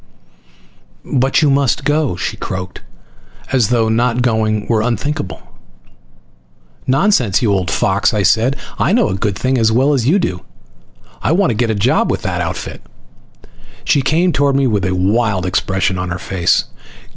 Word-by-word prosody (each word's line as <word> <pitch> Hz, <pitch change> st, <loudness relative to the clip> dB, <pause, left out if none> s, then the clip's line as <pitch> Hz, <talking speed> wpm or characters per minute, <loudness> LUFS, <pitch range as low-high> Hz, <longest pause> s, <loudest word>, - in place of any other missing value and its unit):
"But 135 Hz, +4 st, +2 dB
you 145 Hz, -, +3 dB
must 140 Hz, 0 st, +1 dB
go!" 145 Hz, -, +1 dB
she -, -, -4 dB
croaked 95 Hz, -1 st, -6 dB, 0.7 s
as 125 Hz, -6 st, +2 dB
though 120 Hz, -2 st, +2 dB
my 110 Hz, -, +1 dB
not 120 Hz, +1 st, +1 dB
going 110 Hz, -3 st, 0 dB
were 110 Hz, -2 st, +1 dB
unthinkable. 125 Hz, 0 st, -3 dB, 1.5 s
"Nonsense, 130 Hz, -, +2 dB
you 105 Hz, -3 st, +2 dB
old 95 Hz, -3 st, -1 dB
fox," 95 Hz, +3 st, +1 dB
I 105 Hz, -3 st, 0 dB
said. 115 Hz, +7 st, +2 dB, 0.2 s
"I 185 Hz, -, +2 dB
know 235 Hz, -1 st, +2 dB
a -, -, -2 dB
good 100 Hz, 0 st, -2 dB
thing 130 Hz, +4 st, 0 dB
as 110 Hz, -1 st, +3 dB
well 135 Hz, +6 st, +2 dB
as 125 Hz, -4 st, 0 dB
you 170 Hz, +8 st, +4 dB
do. 90 Hz, -, -2 dB, 0.8 s
I -, -, 0 dB
want 185 Hz, -3 st, +2 dB
to -, -, -2 dB
get 120 Hz, +1 st, 0 dB
a 110 Hz, -, 0 dB
job 100 Hz, -, +1 dB
with -, -, -2 dB
that -, -, -2 dB
outfit." -, -, -5 dB, 1.0 s
She 140 Hz, -, +2 dB
came 165 Hz, +6 st, +1 dB
toward 140 Hz, -1 st, +1 dB
me 140 Hz, 0 st, +2 dB
with 105 Hz, -7 st, 0 dB
a 95 Hz, 0 st, -1 dB
wild 100 Hz, 0 st, 0 dB
expression 95 Hz, +1 st, -1 dB
on 90 Hz, 0 st, -3 dB
her 85 Hz, -, -3 dB
face. 95 Hz, -2 st, 0 dB
115 Hz, 170 wpm, -16 LUFS, 95-135 Hz, 1.5 s, you